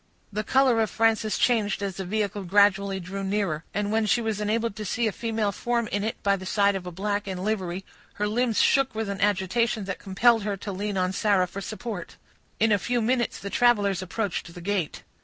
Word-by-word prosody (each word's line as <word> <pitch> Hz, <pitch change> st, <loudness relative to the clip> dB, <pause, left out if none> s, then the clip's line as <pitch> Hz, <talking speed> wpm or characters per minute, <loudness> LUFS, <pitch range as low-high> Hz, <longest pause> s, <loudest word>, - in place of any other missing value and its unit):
The 210 Hz, +1 st, -1 dB
color 255 Hz, -1 st, +3 dB
of 220 Hz, -, +1 dB
Frances 225 Hz, -1 st, +1 dB
changed 215 Hz, -4 st, +1 dB
as 195 Hz, -2 st, -3 dB
the 190 Hz, -, -4 dB
vehicle 205 Hz, 0 st, -2 dB
gradually 200 Hz, 0 st, +3 dB
drew 190 Hz, +2 st, -5 dB
nearer; 190 Hz, -6 st, -1 dB
and 205 Hz, 0 st, -1 dB
when 220 Hz, 0 st, +1 dB
she 225 Hz, -, +3 dB
was 220 Hz, -2 st, -2 dB
enabled 225 Hz, +1 st, 0 dB
to 215 Hz, -, -4 dB
see 230 Hz, +3 st, -1 dB
a 220 Hz, -, +1 dB
female 225 Hz, -2 st, -1 dB
form 235 Hz, +3 st, -1 dB
in 205 Hz, 0 st, -1 dB
it 220 Hz, -, -1 dB
by 200 Hz, 0 st, +3 dB
the 185 Hz, -1 st, -8 dB
side 200 Hz, 0 st, +3 dB
of 185 Hz, -2 st, -5 dB
a -, -, -5 dB
black 205 Hz, +3 st, -2 dB
in 185 Hz, -1 st, -4 dB
livery, 190 Hz, -3 st, -2 dB, 0.3 s
her 210 Hz, -, -1 dB
limbs 230 Hz, +1 st, +1 dB
shook 270 Hz, -4 st, +3 dB
with 220 Hz, -2 st, -2 dB
an 200 Hz, 0 st, -4 dB
agitation 205 Hz, +3 st, +1 dB
that 195 Hz, -1 st, -4 dB
compelled 225 Hz, +4 st, +3 dB
her 205 Hz, -1 st, -2 dB
to 205 Hz, +1 st, -6 dB
lean 200 Hz, +1 st, -3 dB
on 185 Hz, 0 st, 0 dB
Sarah 195 Hz, -2 st, +2 dB
for 200 Hz, +2 st, -7 dB
support. 215 Hz, -2 st, -6 dB, 0.4 s
In 225 Hz, 0 st, +3 dB
a 205 Hz, -, +4 dB
few 245 Hz, +5 st, 0 dB
minutes 240 Hz, +1 st, 0 dB
the 200 Hz, -, -7 dB
travelers 205 Hz, -6 st, +3 dB
approached 185 Hz, -2 st, -3 dB
the 175 Hz, -, -10 dB
gate. 185 Hz, -3 st, -2 dB
205 Hz, 215 wpm, -26 LUFS, 195-225 Hz, 0.4 s, a